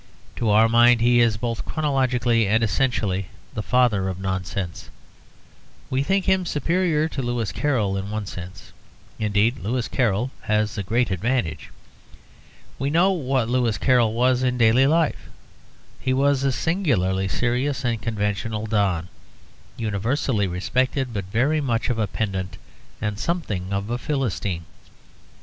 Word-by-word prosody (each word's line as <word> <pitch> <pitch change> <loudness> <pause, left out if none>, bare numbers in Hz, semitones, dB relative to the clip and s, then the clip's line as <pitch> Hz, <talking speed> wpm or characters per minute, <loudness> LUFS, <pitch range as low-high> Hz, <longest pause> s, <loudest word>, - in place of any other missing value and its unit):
To 115 - 0
our 110 +2 +5
mind 120 +1 +5
he 120 +1 +4
is 115 -3 +3
both 115 0 -3
chronologically 125 -7 +1
and 110 +3 +2
essentially 105 -5 0 0.3
the 110 - -3
father 110 -4 +2
of 95 -1 -5
nonsense; 95 -1 -4 1.0
we 130 +1 +1
think 190 +6 +1
him 190 -1 +2
superior 165 -1 +1
to 140 - -4
Lewis 120 -6 -2
Carroll. 110 - 0
In 95 +1 -4
one 105 0 -3
sense, 90 +1 -9 0.5
indeed, 105 +3 +1
Lewis 120 +5 -2
Carroll 120 0 0
has 105 -1 +1
a - - -2
great 115 +4 0
advantage. 105 -1 -1 1.1
We 135 - 0
know 175 +6 +4
what 135 -9 0
Lewis 120 -3 +1
Carroll 120 -4 +3
was 125 +1 +2
in 125 -1 0
daily 120 +3 +5
life: 160 +1 +1 0.7
he 130 - 0
was 135 0 +2
a 135 - +2
singularly 115 - 0
serious 125 +6 -1
and 115 -3 -1
conventional 105 0 -2
don, 100 -6 0 0.7
universally 110 0 0
respected, 125 +8 -1
but 100 -3 -3
very 130 +10 +1
much 120 -3 0
of 115 - -2
a 105 - +1
pedant 95 -3 -3 0.4
and 105 -1 -3
something 105 - -2
of 100 +3 -2
a 120 - -1
Philistine. 105 - -2
115 Hz, 140 wpm, -23 LUFS, 100-130 Hz, 1.1 s, our